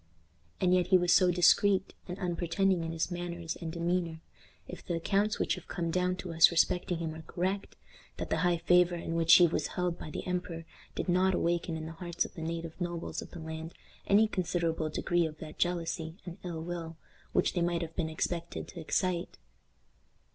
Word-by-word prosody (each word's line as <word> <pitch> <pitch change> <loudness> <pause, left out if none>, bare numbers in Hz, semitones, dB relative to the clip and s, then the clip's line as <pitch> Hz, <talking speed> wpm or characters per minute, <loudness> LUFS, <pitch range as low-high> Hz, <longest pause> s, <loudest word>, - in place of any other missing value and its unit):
And 180 -1 +3
yet 180 -1 +3
he 185 - +6
was 180 0 +3
so 185 -1 +5
discreet 185 +2 +4
and 180 0 -5
unpretending 180 0 0
in 165 - -3
his 165 +2 -2
manners 175 -1 -4
and 165 -2 -5
demeanor, 170 -1 -1 0.5
if 180 - -9
the 175 - -2
accounts 200 +5 +1
which - - +1
have - - -8
come 170 -2 -2
down 180 +1 +1
to 185 -2 -6
us 160 0 +7
respecting 175 +1 +1
him 160 -1 -3
are 160 - -8
correct, 185 +5 -3 0.4
that - - -5
the - - +2
high 175 -1 +2
favor 180 +1 +4
in 165 -1 -4
which 165 0 +3
he 175 - +8
was 165 - 0
held 180 -1 -1
by - - -7
the - - -5
emperor 180 -2 -3 0.3
did - - -3
not 185 +1 +3
awaken 170 -1 0
in 155 - -6
the 160 - -6
hearts 170 +1 -2
of - - -10
the 165 - -8
native 165 +1 -5
nobles 175 -1 -3
of - - -9
the - - -10
land 160 +1 -7 0.3
any 210 +2 +5
considerable 170 -5 -1
degree 175 +2 +1
of 155 -1 -9
that 155 -1 -10
jealousy 170 -1 -1
and 175 +1 -8
ill 165 -3 -4
will 165 -1 -5 0.3
which - - +2
they 175 - 0
might 170 0 0
have 165 0 -7
been 165 -3 -1
expected 170 +2 -3
to 175 - -9
excite. 175 +2 -1
175 Hz, 200 wpm, -31 LUFS, 165-180 Hz, 0.5 s, he